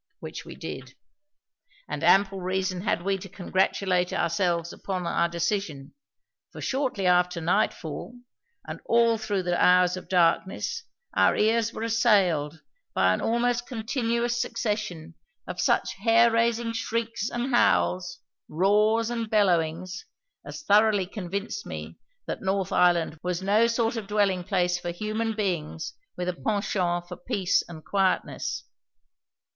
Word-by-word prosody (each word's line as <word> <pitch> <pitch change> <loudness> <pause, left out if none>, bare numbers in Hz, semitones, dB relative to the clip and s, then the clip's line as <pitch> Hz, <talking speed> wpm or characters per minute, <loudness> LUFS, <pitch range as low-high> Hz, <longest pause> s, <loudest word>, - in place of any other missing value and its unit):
Which - - -8
we - - -9
did. - - -8 0.9
And - - -5
ample 195 0 +4
reason 185 0 -1
had 190 -3 -1
we 195 0 0
to 195 - -9
congratulate 185 -1 0
ourselves 170 0 0
upon 185 -2 -4
our 170 0 +1
decision, 170 -5 -3 0.6
for - - -10
shortly 260 -7 -1
after 180 -1 +3
nightfall 175 +3 -1 0.5
and - - -7
all 230 -1 +3
through 205 -3 -1
the 175 0 +1
hours 180 0 +5
of 185 - -9
darkness 190 - +1 0.3
our - - +4
ears 225 +1 +2
were 225 - -6
assailed 190 -10 +2 0.3
by 95 0 +4
an - - -2
almost 240 +1 0
continuous 235 0 -1
succession 205 -8 -3 0.3
of - - -4
such - - +1
hair 230 +3 +4
raising 230 0 +1
shrieks 230 -1 -2
and 240 +2 -3
howls, 180 -6 +2 0.3
roars 210 +6 +2
and 230 -2 -3
bellowings, 185 -3 0 0.4
as - - -8
thoroughly 210 -3 +4
convinced 200 - -5
me - - -8 0.3
that - - -5
North 190 -1 -1
Island 170 -3 +2
was 180 0 -3
no 210 +4 +4
sort 230 0 0
of 215 -3 -5
dwelling 200 -3 +1
place 180 -2 +1
for 175 - -5
human 215 +5 -2
beings 165 -5 -3 0.2
with 180 0 -3
a 180 - 0
penchant 180 -3 -1
for 180 -1 -8
peace 200 -4 0
and 160 -2 -10
quietness. 195 -2 -1
195 Hz, 135 wpm, -26 LUFS, 180-225 Hz, 0.9 s, hours